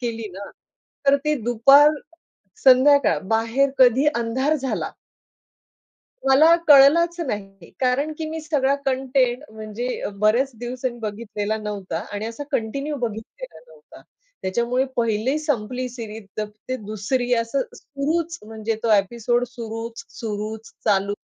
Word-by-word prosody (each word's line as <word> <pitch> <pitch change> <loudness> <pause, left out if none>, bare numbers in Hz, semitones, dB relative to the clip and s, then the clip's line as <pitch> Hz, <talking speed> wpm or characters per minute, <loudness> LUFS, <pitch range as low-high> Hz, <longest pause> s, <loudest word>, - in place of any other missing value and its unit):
केली 230 -3 -4
ना, 195 +2 -8 0.6
तर 275 - +6
ती 300 0 +2
दुपार 275 +6 +6 0.7
संध्याकाळ 275 +2 +6
बाहेर 230 +5 +2
कधी 255 +2 +5
अंधार 250 +6 0
झाला. 265 -2 -3 1.4
मला 300 +5 +6
कळलाच 310 +5 +6
नाही 195 -6 -6
कारण 270 +4 +1
की 320 - -3
मी 320 0 -4
सगळा 290 -4 +1
कंटेंट 260 -1 +1
म्हणजे 220 +3 -5 0.2
बऱ्याच 235 +6 +3
दिवसांनी 245 +1 -4
बघितलेला 215 -1 -3
नव्हता 205 -5 -4
आणि 205 +1 -3
असा 230 +6 -6
कंटिन्यू 275 +6 -2
बघितलेला 235 - -6
नव्हता. - - -17 0.4
त्याच्यामुळे 235 +6 0
पहिली 230 +4 +1
संपली 255 -4 -2
सीरीज 225 -3 -8
तर 215 - 0 0.2
ते 255 - -1
दुसरी 240 +4 -1
असं 230 +4 -1
सुरूच 320 +4 -3
म्हणजे 220 0 -3
तो 230 - 0
ॲपिसोड 235 +4 +2
सुरूच, 230 -1 -7 0.2
सुरूच 215 0 -5
चालू. 200 -1 +2
240 Hz, 120 wpm, -22 LUFS, 220-275 Hz, 1.4 s, तर